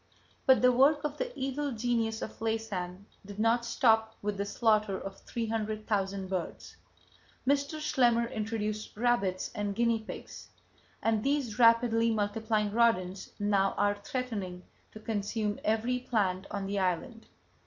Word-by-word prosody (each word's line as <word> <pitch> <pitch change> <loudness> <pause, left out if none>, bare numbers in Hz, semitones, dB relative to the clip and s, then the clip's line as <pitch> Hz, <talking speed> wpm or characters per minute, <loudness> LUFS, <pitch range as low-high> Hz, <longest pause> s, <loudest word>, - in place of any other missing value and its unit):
But 260 -1 +6
the 250 - +7
work 280 +5 +4
of 295 -1 -3
the - - -2
Evil 275 +2 -2
Genius 225 -1 -1
of - - -7
Laysan 200 -5 -3 0.2
did 200 0 -10
not 230 +2 +2
stop 225 -2 +2
with 210 0 -1
the 200 +1 -3
slaughter 215 -3 +2
of 195 0 -7
three 230 -1 -4
hundred 215 -1 -3
thousand 195 -2 -1
birds. 185 -2 -5 0.7
Mr. 285 +2 +1
Schlemmer 245 -6 +3
introduced 215 -1 -3
rabbits 210 -6 +1
and 205 -2 -2
guinea 235 0 +2
pigs; 220 - -9 0.6
and 220 -1 +2
these 270 -6 0
rapidly 230 -1 +5
multiplying 215 0 0
rodents 200 -5 +1
now 200 -1 +2
are 205 0 +3
threatening 205 -4 -4 0.3
to 215 - -10
consume 215 0 -2
every 225 +4 +1
plant 195 -6 -1
on 200 -1 -3
the 200 +1 -1
island. 190 +6 -2
220 Hz, 145 wpm, -30 LUFS, 205-235 Hz, 0.7 s, the